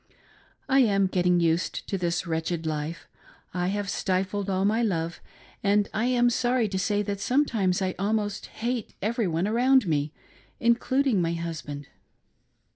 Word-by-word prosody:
I 270 0 +4
am 200 -6 +4
getting 180 -1 +2
used 165 +1 0
to - - -2
this 175 -1 -1
wretched 165 0 -2
life; 155 +1 -3 0.5
I 180 0 -1
have 205 +1 -1
stifled 190 +1 -1
all 190 0 +1
my 220 +3 +2
love; 170 -6 -1 0.4
and 205 0 +3
I 220 +3 0
am 245 -1 +3
sorry 240 0 +1
to 190 -1 -2
say 205 +1 +1
that 200 -1 -3
sometimes 205 -7 +1
I 185 -1 0
almost 205 0 -1
hate 235 -1 -4
every 225 0 0
one 170 +3 0
around 250 +2 +4
me, 150 -2 0 0.5
including 235 -1 +2
my 165 0 0
husband. 155 -4 -5
195 Hz, 150 wpm, -26 LUFS, 170-225 Hz, 0.5 s, I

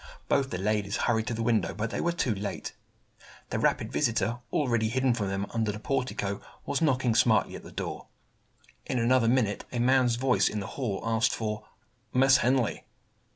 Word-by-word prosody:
Both 135 -1 +2
the 90 - -3
ladies 100 +1 0
hurried 110 -2 +1
to 120 - -1
the 115 - -2
window, 115 -1 +1
but 110 +1 -3
they - - -2
were 170 - +1
too 130 -9 0
late. 100 0 -5 0.8
The - - -1
rapid - - +1
visitor, 115 -3 0
already 120 -6 +1
hidden 130 +1 +2
from 110 -4 -2
them 95 +1 -2
under 110 -2 0
the 105 - -6
portico, 125 -6 -2 0.2
was 140 - -1
knocking 130 -6 +2
smartly 115 -1 +3
at - - -8
the - - -12
door. - - -5 0.8
In 130 - -1
another 120 0 +3
minute, 115 -5 +1
a 125 - -3
man's 125 0 +3
voice 125 +1 +2
in 105 - -3
the 100 - -4
hall 115 -8 -3
asked 115 +1 +2
for 105 -1 -4 0.5
"Miss 135 +1 +6
Henley." 125 -2 +1
115 Hz, 185 wpm, -28 LUFS, 110-130 Hz, 0.8 s, Miss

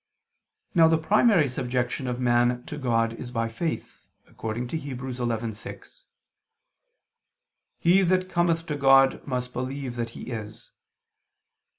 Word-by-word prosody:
Now 165 -3 +6
the 160 0 +4
primary 195 0 +4
subjection 125 0 -2
of 125 0 -3
man 120 0 +2
to 150 -2 -6
God 115 -3 +1
is 120 +1 -8
by 115 -2 -1
faith, 160 +8 -5 0.2
according 115 +2 -5
to 160 - -2
Heb. 140 -4 -6
11:6: 120 - -5 1.8
"He 180 +3 +4
that 185 0 +2
cometh 170 -2 +1
to 150 - -3
God, 135 -1 +5
must 125 -1 -3
believe 130 0 -4
that 115 -1 -2
He - - -7
is." 110 0 -7
125 Hz, 125 wpm, -26 LUFS, 120-160 Hz, 1.8 s, Now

